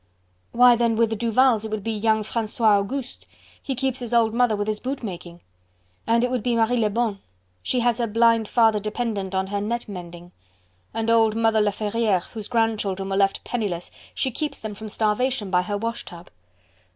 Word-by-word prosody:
"Why, 245 0 +6
then, 235 -1 +1
with 225 0 +2
the - - 0
Duvals 230 0 +2
it 220 - -5
would 215 -2 -4
be 225 - -2
young 220 0 +1
Francois 220 -1 +1
Auguste. 250 +5 -5 0.3
He 270 - -3
keeps 260 0 -1
his 240 -1 -2
old 225 -2 +3
mother 240 -2 +2
with 205 0 -2
his 215 -1 -2
boot 260 0 -4
making..." 175 -4 -7 0.7
"And 230 +1 +3
it 250 - 0
would 250 -2 -1
be 240 +1 0
Marie 230 +2 +2
Lebon, 220 -1 0 0.4
she 245 - 0
has 240 0 +1
her 235 - 0
blind 230 0 +3
father 225 -2 +3
dependent 210 -2 -3
on 190 0 +1
her 200 +1 -3
net 235 +3 -3
mending." 175 -3 -9 0.6
"And 225 0 -1
old 225 -1 +4
Mother 225 -1 +2
Laferriere, 210 -1 0
whose 220 -3 -6
grandchildren 210 -5 -1
were 195 - -1
left 195 0 +1
penniless... 200 -8 -3 0.2
she 260 - -1
keeps 300 +5 -3
them 220 -1 -6
from 215 +1 -8
starvation 215 0 0
by 180 -1 +3
her 205 +2 -3
wash 230 +2 -4
tub." 175 0 -12
220 Hz, 190 wpm, -23 LUFS, 205-235 Hz, 0.7 s, Why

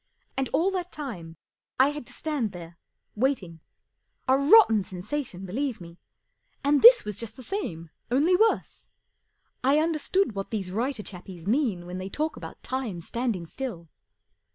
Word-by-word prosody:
And 270 -1 -1
all 365 +4 +2
that 360 -2 -3
time 180 - -7 0.4
I 265 +2 +6
had 295 -4 -6
to - - -11
stand 290 -9 -2
there, 170 -1 -10 0.3
waiting. 210 -9 -1 0.7
A 260 - +5
rotten 280 - +6
sensation, 190 +2 -5
believe 250 +6 -2
me, 170 0 -12 0.6
and 285 +1 +3
this - - +9
was 210 -2 -4
just 225 -2 -4
the 255 - -10
same, 170 - -4 0.2
only 295 +9 +3
worse. 440 +4 +1 0.7
I 275 +3 +4
understood 325 +2 +1
what 195 -1 -4
these 195 -5 -3
writer 230 +2 -2
chappies 180 -3 -9
mean 215 -6 0
when 180 +1 -6
they 190 +1 -5
talk 310 +8 -2
about - - -10
time 255 -9 -3
standing 225 -1 -2
still. 170 -5 -6
240 Hz, 155 wpm, -27 LUFS, 185-290 Hz, 0.7 s, this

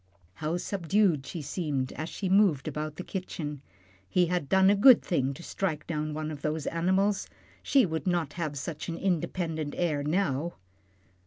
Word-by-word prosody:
How 155 - -2
subdued 180 -5 +1
she 160 +1 -5
seemed 140 -3 -2
as 155 +2 -5
she 195 - -4
moved 185 -8 +3
about 150 0 -4
the 185 - -6
kitchen. 155 -7 -5 0.5
He 180 - +3
had 175 -5 -2
done 190 +1 +5
a - - +4
good 240 +4 +7
thing 135 -6 0
to 170 - -11
strike 165 -6 -2
down 155 -1 -3
one 155 0 -3
of 145 -2 -7
those 155 0 -2
animals. 190 +4 +1 0.3
She 270 -4 +4
would 160 +1 -3
not 170 -5 0
have 155 -4 -3
such 155 +4 -5
an 165 - -3
independent 165 -4 -1
air 155 -5 0
now. 155 0 0
165 Hz, 170 wpm, -29 LUFS, 150-185 Hz, 0.5 s, good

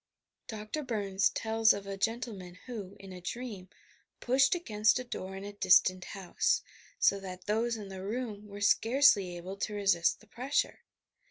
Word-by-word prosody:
Dr. 215 +6 -5
Burns 200 -7 +1
tells 225 0 +3
of 200 -1 -6
a 195 0 -4
gentleman, 200 -4 -3
who, 205 -6 -7
in 195 -1 -10
a 180 - -9
dream, 205 -2 -6 0.5
pushed 265 +5 +3
against 215 -11 +2
a 255 - -3
door 190 -6 -6
in 195 - -7
a 205 0 -7
distant 185 -2 +4
house, 190 -3 +1 0.3
so 200 - +3
that 185 -1 -8
those 225 +2 0
in 205 -2 -8
the 190 -1 -7
room 210 -1 -4
were 205 0 -9
scarcely 210 -5 +4
able 185 +3 -7
to 210 +1 -3
resist 195 -4 +2
the - - -19
pressure 255 +6 -1
205 Hz, 165 wpm, -31 LUFS, 190-230 Hz, 0.5 s, distant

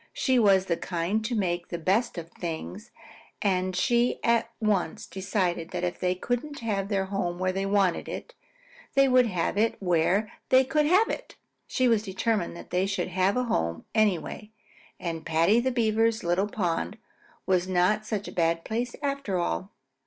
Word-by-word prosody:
She 260 - +2
was 195 -4 +4
the 170 -3 0
kind 180 +5 -1
to 235 - -1
make 175 -4 -1
the 170 - -4
best 190 +7 +1
of 165 0 -7
things, 180 +6 -6 0.5
and 185 -2 0
she 240 +5 +2
at 230 -1 +2
once 205 -7 0
decided 185 -4 -2
that - - -4
if 175 -1 -2
they 180 0 +1
couldn't 245 +9 -3
have 200 -4 -1
their 195 -2 0
home 190 -3 -2
where 185 +1 0
they 195 +1 -2
wanted 195 -3 +1
it, - - -7 0.6
they 275 0 +6
would 255 -2 +5
have 185 0 -1
it 225 +1 +2
where 185 +3 +1 0.2
they 260 0 +6
could 295 +3 +1
have 385 +7 +5
it. - - -5 0.3
She 255 -2 +1
was 225 -3 +3
determined 195 -2 -1
that - - -12
they 185 +2 +1
should 195 -1 -2
have 185 +4 +1
a 250 - +2
home 85 - -1
anyway, 210 0 0 0.5
and 165 -2 -4
Paddy 165 +9 +3
the 255 +2 +1
Beaver's 225 -2 +1
little 175 +4 +1
pond 170 - -2 0.5
was 185 -1 +2
not 185 +4 +2
such 210 -2 -3
a - - -6
bad 165 -1 +1
place 235 +2 -2
after 275 -9 -1
all. 95 - -2
195 Hz, 175 wpm, -27 LUFS, 180-230 Hz, 0.6 s, they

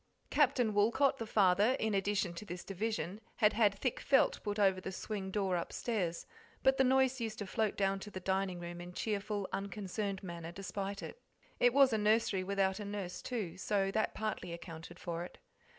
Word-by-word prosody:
Captain 250 -6 +3
Woolcot, 235 +7 +3
the 225 - -4
father, 205 +3 +4
in 220 -1 0
addition 195 -2 +1
to 170 - -7
this 175 -3 -6
division, 200 -1 -3
had 210 -2 +4
had 210 -2 +3
thick 250 +3 -1
felt 270 - +3
put 205 -1 -3
over 190 -2 +3
the 190 - -4
swing 195 0 -4
door 190 -2 0
upstairs, 175 0 -2 0.4
but 265 0 +5
the 265 - +5
noise 265 0 +3
used 225 -2 -3
to 205 - -4
float 215 +2 -1
down 195 -1 +1
to 210 - -8
the 190 - -6
dining 190 -1 -1
room 175 0 -6
in 175 0 -8
cheerful, 205 -1 -2
unconcerned 200 0 -3
manner 170 -2 -6
despite 195 +2 -4
it. 485 - -8 0.4
It 245 - +5
was 270 -1 +6
a 220 - +2
nursery 210 -2 +2
without 195 0 +1
a - - -4
nurse, 200 -3 -4
too, 205 -9 -4
so 195 0 +1
that 220 - 0
partly 215 -5 -3
accounted 170 0 -9
for 170 -1 -4
it. 180 - -10
200 Hz, 190 wpm, -34 LUFS, 185-220 Hz, 0.4 s, was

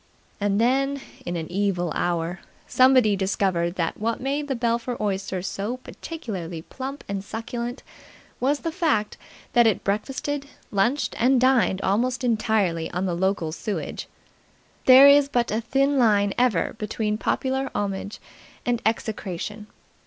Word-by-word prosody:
And 200 0 +1
then, 275 +4 +2 0.3
in 175 - -2
an 165 -2 -3
evil 180 -3 0
hour, 175 +1 -1 0.3
somebody 255 -5 +5
discovered 190 -3 0
that 165 -3 -2
what 225 +2 -1
made 280 +3 -2
the 270 - -1
Belpher 235 +1 -1
Oyster 195 -3 -2
so 205 +5 -3
particularly 190 - -7
plump 270 +7 -7
and 200 -1 -3
succulent 235 +4 -5 0.6
was 285 +3 +1
the 330 - -2
fact 310 - 0 0.4
that 240 -1 +6
it 215 - +1
breakfasted, 270 +7 -2 0.2
lunched 235 +8 +1
and 255 +2 +4
dined 245 -7 +3
almost 250 +6 0
entirely 215 -8 +1
on 180 +2 -2
the 180 - -1
local 180 -2 0
sewage. 205 +5 -4 0.8
There 260 +2 +9
is 280 0 +6
but 240 -4 0
a 220 +2 0
thin 275 +4 +1
line 205 -4 +3
ever 240 -9 +1
between 210 0 -2
popular 265 +2 -1
homage 200 0 -3 0.5
and 240 -1 0
execration. 210 -2 -3
220 Hz, 140 wpm, -24 LUFS, 195-255 Hz, 0.8 s, There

